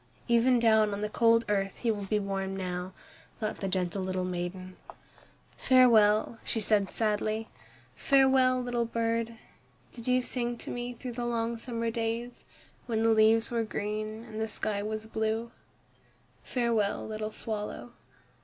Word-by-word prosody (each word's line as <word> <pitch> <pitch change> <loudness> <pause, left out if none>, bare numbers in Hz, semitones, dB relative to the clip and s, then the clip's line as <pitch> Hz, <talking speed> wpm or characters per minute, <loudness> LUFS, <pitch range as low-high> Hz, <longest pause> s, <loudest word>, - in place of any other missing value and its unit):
"Even 240 +1 +4
down 220 -3 +4
on 200 - -6
the 210 - -1
cold 230 +1 +3
earth 195 -2 -1
he 235 - 0
will 205 -2 -4
be 210 +2 0
warm 195 -1 -3
now," 180 -1 -4 0.5
thought 215 -1 -3
the 195 - -3
gentle 185 0 -1
little 185 -1 -2
maiden. 185 +1 -5 0.8
"Farewell," 225 -3 +4
she 225 - 0
said 205 -2 +3
sadly, 215 0 -1 0.5
"farewell, 265 -2 +4
little 245 -1 -1
bird! 230 0 -1 0.5
Did 235 0 -9
you 250 0 +3
sing 240 -1 -2
to - - -6
me 245 0 -4
through 250 +1 -6
the 240 0 -4
long 230 0 -1
summer 230 -1 -3
days, 230 +1 -3 0.4
when 225 -2 0
the 225 - +4
leaves 225 +1 +4
were 235 -1 +1
green 215 +1 -4
and 220 -2 -7
the 220 - 0
sky 210 -1 -2
was 215 +1 -4
blue? 220 +1 -2 0.9
Farewell, 230 -5 0
little 215 0 -4
swallow!" 210 - -5
220 Hz, 150 wpm, -29 LUFS, 205-235 Hz, 0.9 s, Even